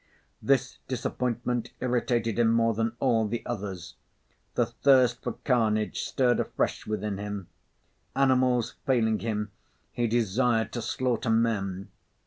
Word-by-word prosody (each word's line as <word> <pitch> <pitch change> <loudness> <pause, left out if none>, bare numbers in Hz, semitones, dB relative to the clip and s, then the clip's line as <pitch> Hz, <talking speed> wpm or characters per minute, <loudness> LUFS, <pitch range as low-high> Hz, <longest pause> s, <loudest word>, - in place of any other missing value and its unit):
This 135 -1 +1
disappointment 125 -1 -2
irritated 120 -2 0
him 115 -1 +4
more 115 0 +3
than 115 +1 -1
all 115 -5 +2
the 115 +2 -4
others. 95 -7 -5 0.6
The - - +3
thirst 130 -3 +3
for - - -3
carnage 110 -5 +1
stirred 125 -2 +1
afresh - - -1
within 105 -2 -2
him; 100 -3 -5 0.7
animals 130 -3 +2
failing 110 -5 +2
him, 105 -2 -2 0.4
he 120 -1 0
desired 115 +1 +1
to 120 - -3
slaughter 125 -1 -1
men. 100 -4 0
115 Hz, 120 wpm, -27 LUFS, 105-125 Hz, 0.7 s, him